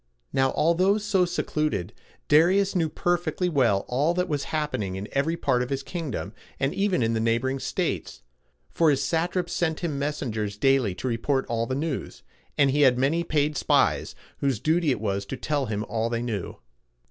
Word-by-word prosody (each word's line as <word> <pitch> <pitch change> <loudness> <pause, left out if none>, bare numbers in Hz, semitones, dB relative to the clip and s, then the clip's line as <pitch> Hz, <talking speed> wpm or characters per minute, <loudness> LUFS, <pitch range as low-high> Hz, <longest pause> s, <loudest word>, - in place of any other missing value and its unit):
Now, 135 0 +2
although 185 +6 +3
so 205 -3 +2
secluded, 155 - -2 0.3
Darius 185 +6 +4
knew 165 -3 +1
perfectly 175 +2 0
well 120 - +2
all 145 +7 +1
that 180 0 0
was 145 -2 -2
happening 150 -12 -2
in 95 +2 -5
every 160 +5 0
part 130 -6 +1
of 125 - -3
his 135 -1 -2
kingdom, 165 -7 -5 0.3
and 135 +1 0
even 195 - +1
in 115 0 +1
the 110 - 0
neighboring 115 +4 0
states; - - -3 0.5
for 165 -2 +3
his 140 -2 +2
satraps 175 +1 -1
sent 160 -2 -1
him 155 -5 -2
messengers 110 -8 -3
daily 130 -6 +2
to 130 - -4
report 130 +3 0
all 115 0 -1
the 130 - -2
news, 150 0 -4 0.3
and 140 -2 +4
he 145 +2 +2
had 130 -3 +5
many 145 +6 +1
paid 150 -2 0
spies, - - +1 0.2
whose 135 -6 0
duty 160 +3 +1
it 130 - +1
was 100 -2 -1
to 135 - -5
tell 145 -2 -1
him 105 -1 -2
all 115 0 -1
they 115 0 -2
knew. 110 -6 -4
140 Hz, 180 wpm, -26 LUFS, 120-165 Hz, 0.5 s, had